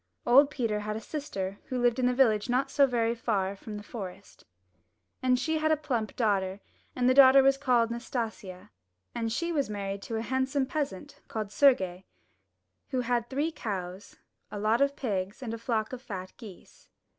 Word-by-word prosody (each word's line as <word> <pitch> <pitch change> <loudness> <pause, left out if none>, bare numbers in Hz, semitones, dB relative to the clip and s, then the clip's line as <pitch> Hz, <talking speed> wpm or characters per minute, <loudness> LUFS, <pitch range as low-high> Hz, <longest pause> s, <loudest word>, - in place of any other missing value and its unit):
Old 275 +4 +6
Peter 230 -7 -1
had 210 0 -4
a - - -3
sister 200 -8 -5
who 255 - -4
lived 240 0 +2
in 250 - +3
the 250 - +2
village 225 -4 +3
not 265 +2 +1
so 280 -2 +5
very 235 -2 +1
far 215 -5 -1
away 200 - -6
from 210 +2 -8
the 205 - -8
forest. 200 -3 -9 0.8
And 255 -1 +3
she 315 +5 -1
had 310 0 +1
a 310 - +3
plump 245 -8 -3
daughter, 195 -4 0 0.4
and 250 -1 +1
the 255 - +5
daughter 270 0 +8
was 270 0 +5
called 250 -4 +2
Nas 235 +1 -6
tasia, 215 -6 -5 0.4
and 230 -1 -2
she 340 +9 -1
was 285 -8 0
married 200 -1 -4
to 225 - -5
a 220 - -2
handsome 265 +2 0
peasant 265 -9 -4
called 215 -2 -4
Sergie, 190 -9 +3 0.8
who 260 -2 0
had 240 -1 -1
three 290 +5 -1
cows, 190 - -6 0.3
a - - -6
lot 215 +4 +1
of 280 0 +2
pigs, 205 -2 -3
and 230 -2 -4
a 230 - -5
flock 225 0 -2
of 250 - -6
fat 185 -7 -7
geese. 210 -7 -14
235 Hz, 190 wpm, -29 LUFS, 205-265 Hz, 0.8 s, daughter